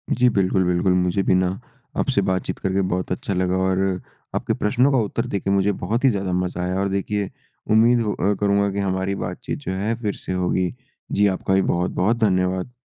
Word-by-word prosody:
जी 125 0 +4
बिल्कुल, 95 -3 +2
बिल्कुल। 90 +1 +2
मुझे 90 +1 +1
भी - - +2
ना, 95 +1 0 0.4
आपसे - - +2
बातचीत 95 -1 -1
करके 95 0 0
बहुत 90 +1 -2
अच्छा 90 +2 -2
लगा 90 0 0
और 95 0 +1 0.6
आपके - - 0
प्रश्नों 125 +6 +2
का 135 - +3
उत्तर 115 +1 -1
देके 100 -4 -2
मुझे 100 +1 +3
बहुत 105 +6 -2
ही 135 - +6
ज़्यादा 100 -5 -1
मज़ा 90 0 -1
आया 90 +1 -1
और 100 0 0
देखिए 100 0 -1 0.4
उम्मीद 115 +3 +5
अ, 105 -2 0
करूँगा 100 0 +2
कि 100 - -3
हमारी 95 0 -1
बातचीत 90 +10 -5
जो 140 - -5
है 100 +5 -1
फ़िर 105 -3 -1
से - - -5
होगी। 90 0 0 0.4
जी 105 0 +3
आपका 95 0 -1
भी 95 - +4
बहुत-बहुत 90 +5 +1
धन्यवाद। 95 +1 +1
95 Hz, 195 wpm, -22 LUFS, 90-105 Hz, 0.6 s, ही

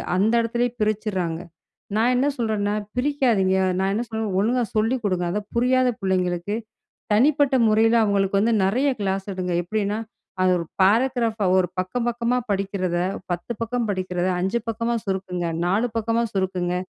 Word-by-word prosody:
அந்த 210 +5 +2
இடத்திலேயே 235 +1 0
பிரிச்சிட்றாங்க. 200 -6 -1 0.6
நான் 235 +3 +3
என்ன 275 +3 +2
சொல்றேன்னா 210 -3 0 0.2
பிரிக்காத 250 -6 +2 0.4
நான் 195 0 +1
என்ன 235 - 0
சொல்லணும். 220 -4 -2
ஒழுங்கா 240 +3 +1
சொல்லிக் 225 +2 +1
குடுங்க 185 -3 0
அதை 210 +2 -1
புரியாத 255 +1 +3
பிள்ளைங்களுக்கு 185 +1 0 0.6
தனிப்பட்ட 275 +4 +4
முறையில 225 +2 +4
அவங்களுக்கு 200 -1 +2
வந்து 230 +2 +2
நிறைய 250 +9 +2
கிளாஸ் 195 0 -1
எடுங்க. 180 -1 -3
எப்படின்னா 210 +3 -1 0.4
அது 185 - +4
ஒரு 170 - -2 0.2
பாராகிராப் 230 +2 +2 0.2
ஒரு 180 -2 +2
பக்கம் 185 +7 -1
பக்கமா 240 +1 0
படிக்கிறத 195 -3 -1 0.3
10 175 +7 -3
பக்கம் 235 +1 -1
படிக்கிறத 185 -2 -1
5 190 +6 0
பக்கமா 230 +1 -1
சுருக்குங்க. 185 -3 -2 0.2
4 195 +7 +2
பக்கமா 230 +1 +1
சுருக்குங்க. 185 -2 -1
210 Hz, 140 wpm, -23 LUFS, 190-235 Hz, 0.6 s, தனிப்பட்ட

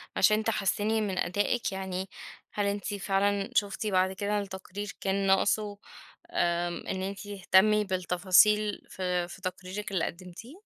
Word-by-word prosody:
عشان 215 0 +4
تحسّني 215 0 +1
من 195 -3 -2
أدائِك، 205 +7 0
يعني 190 0 -4 0.4
هل 205 - 0
أنتِ 200 +1 -2
فعلًا 200 0 0
شُفتِ 205 +1 0
بعد 190 -2 +2
كده 205 +2 -1
التقرير 195 0 -6
كان 195 0 0
ناقصه 205 +2 +2 0.5
آمم، 175 0 0
إن 190 - -2
أنتِ 200 +2 -5
تهتمّي 205 +1 +4
بالتفاصيل 190 +3 +3
في 180 -2 -1
في 180 - -11
تقريرِك 190 +3 -5
اللي 185 -4 +1
قدّمتيه؟ 195 - -9
195 Hz, 135 wpm, -29 LUFS, 185-210 Hz, 0.5 s, عشان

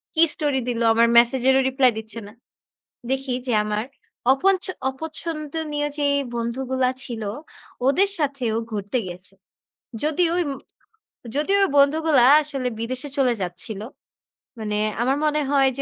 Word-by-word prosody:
কি 320 - +3
স্টোরি 290 -4 0
দিল? 235 -1 -2
আমার 230 +1 +4
মেসেজেরও 260 +2 +4
রিপ্লাই 260 -2 +4
দিচ্ছে 220 +1 -9
না।" 210 - -13 0.8
দেখি 265 -1 -1
যে 245 - +1
আমার 210 +2 -2 0.5
অপনছ 375 +6 +2 0.3
অপছন্দনীয় 305 0 -4
যেই 285 -1 +2 0.2
বন্ধুগুলা 255 +2 -1
ছিল, 230 -3 -6 0.6
ওদের 385 +8 +3
সাথে 275 -4 -1
ও - - +1
ঘুরতে 205 +3 -2
গিয়েছে। 180 +2 -10 0.7
যদিও 330 +2 +2
উম 285 - -3 0.8
যদিও 390 +7 +2
ওই - - -1
বন্ধুগুলা 290 -2 +4 0.2
আসলে 275 -4 -3
বিদেশে 255 +5 -4
চলে 250 -3 +3
যাচ্ছিল। 180 +4 -5 0.8
মানে 210 -1 -2 0.2
আমার 265 +3 +1
মনে 300 0 +1
হয় 275 -1 +4
যে - - -2
265 Hz, 135 wpm, -23 LUFS, 235-295 Hz, 0.8 s, আমার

